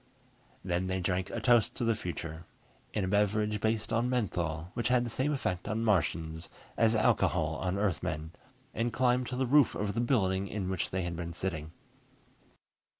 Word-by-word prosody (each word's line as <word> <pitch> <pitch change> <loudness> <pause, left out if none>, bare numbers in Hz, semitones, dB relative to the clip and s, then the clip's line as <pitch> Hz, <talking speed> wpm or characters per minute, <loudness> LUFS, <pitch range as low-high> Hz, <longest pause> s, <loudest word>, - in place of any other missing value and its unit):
Then 90 0 -1
they 95 0 -1
drank 90 +1 -1
a - - -3
toast 120 -3 +3
to 125 - -2
the 115 - +3
future 85 -5 -6 0.5
in 105 - -1
a - - -1
beverage 105 +1 +1
based 110 0 0
on 115 +2 +2
menthol, 85 -9 -1
which 120 0 -1
had 125 0 +3
the 120 - -4
same 130 +7 0
effect 90 -12 -2
on 110 +1 -1
Martians 80 -4 0 0.3
as 115 0 +3
alcohol 110 - +2
on 95 +1 -1
Earthmen 80 -5 -1 0.4
and 120 +1 -1
climbed 125 +1 +2
to 125 - -4
the 130 +1 +1
roof 140 +1 +4
of 100 0 -1
the 115 - 0
building 100 -6 +1
in 95 -2 -3
which 95 - -1
they 95 0 -2
had 85 -1 -3
been 85 0 -5
sitting. 80 -3 -3
100 Hz, 180 wpm, -31 LUFS, 90-115 Hz, 0.5 s, roof